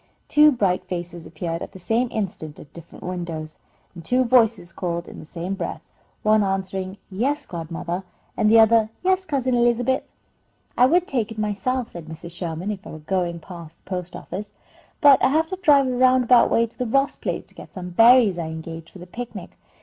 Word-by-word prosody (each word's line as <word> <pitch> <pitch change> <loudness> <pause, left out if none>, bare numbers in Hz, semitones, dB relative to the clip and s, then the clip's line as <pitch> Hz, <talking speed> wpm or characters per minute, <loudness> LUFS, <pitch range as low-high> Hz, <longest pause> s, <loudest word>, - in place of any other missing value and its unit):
Two 300 0 +6
bright 195 -8 0
faces 175 -2 -6
appeared 165 0 -4
at - - -7
the 190 - -11
same 225 +7 0
instant 185 -9 -5
at 145 - -14
different 170 -1 -12
windows, 170 -4 -5 0.4
and 170 -2 -10
two 250 +9 +2
voices 230 -8 +3
called 170 -1 -4
in - - -10
the 155 - -11
same 175 +3 -5
breath, 195 - -5 0.4
one 215 0 +4
answering, 190 0 -2
"Yes, 275 +9 -1
godmother," 170 +2 -5 0.3
and 215 - +2
the 225 +1 +7
other, 225 0 +5
"Yes, 375 0 +1
Cousin 260 -4 0
Elizabeth." 240 +2 +2 0.7
"I 250 - +5
would 350 +5 +3
take 235 - -2
it 220 - -8
myself," 215 +4 -1
said 170 -2 -9
Mrs. 160 +1 -9
Sherman, 175 +3 -4
"if 195 -2 -7
I - - -8
were - - -8
going 175 +2 -2
past 170 -2 -11
the - - -38
post 180 -1 -4
office, 200 +4 -7 0.5
but 285 -4 +7
I - - +6
have 320 +4 +1
to 375 - -3
drive 285 -5 +5
a 255 - -1
roundabout 255 -1 +5
way 230 - +3
to 230 - -16
the 250 - -1
Ross 275 +4 +1
place, - - -4
to - - -19
get - - -12
some 180 -1 -6
berries 225 -2 +6
I 165 - -3
engaged 165 0 -7
for - - -14
the 180 - -10
picnic. 240 +6 -8
195 Hz, 200 wpm, -23 LUFS, 175-245 Hz, 0.7 s, the